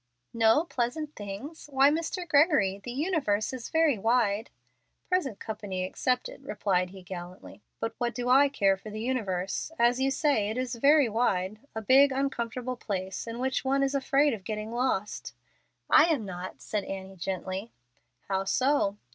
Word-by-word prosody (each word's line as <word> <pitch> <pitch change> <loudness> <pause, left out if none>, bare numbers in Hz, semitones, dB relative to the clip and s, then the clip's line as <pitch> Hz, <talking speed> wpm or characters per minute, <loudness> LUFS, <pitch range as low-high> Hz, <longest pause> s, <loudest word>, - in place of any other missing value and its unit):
'" - - -51
"No 230 +6 +4
'pleasant 300 +1 -3
things'? 210 +12 -8
Why, 275 +1 +5
Mr. 335 +3 -2
Gregory! 285 - +3
The 245 - -5
universe 265 - 0
is 255 -3 -6
very 320 -8 +3
wide." 225 -1 +1 0.6
"Present 345 - 0
company 205 -4 -4
excepted," 250 +8 -2
replied 190 -7 0
he 190 0 -12
gallantly. 180 +2 -9 0.2
"But 225 0 -2
what 240 -2 -1
do 245 0 -3
I 275 +3 +6
care 195 -7 +2
for 205 +3 -10
the 215 +1 -6
universe? 215 - -2
As 240 +2 +3
you 270 - +3
say, 270 -7 +1
it 220 - -3
is 255 0 -2
'very 280 +3 +5
wide' 210 -3 0 0.2
a 220 - -4
big, 270 +5 +6
uncomfortable 255 -2 -2
place, 190 -2 -4
in 230 0 -5
which 260 +1 -1
one 275 +1 +2
is 275 0 0
afraid 275 +1 +2
of 205 -4 -6
getting 215 +1 -4
lost." 235 -4 -2 0.5
"I 310 - +7
am 300 -10 0
not," 185 -1 -7
said 210 -2 -2
Annie, 195 0 -7
gently. 190 +3 -4 0.6
"How 195 0 -1
so?" 255 -4 +1
235 Hz, 165 wpm, -28 LUFS, 200-275 Hz, 0.6 s, I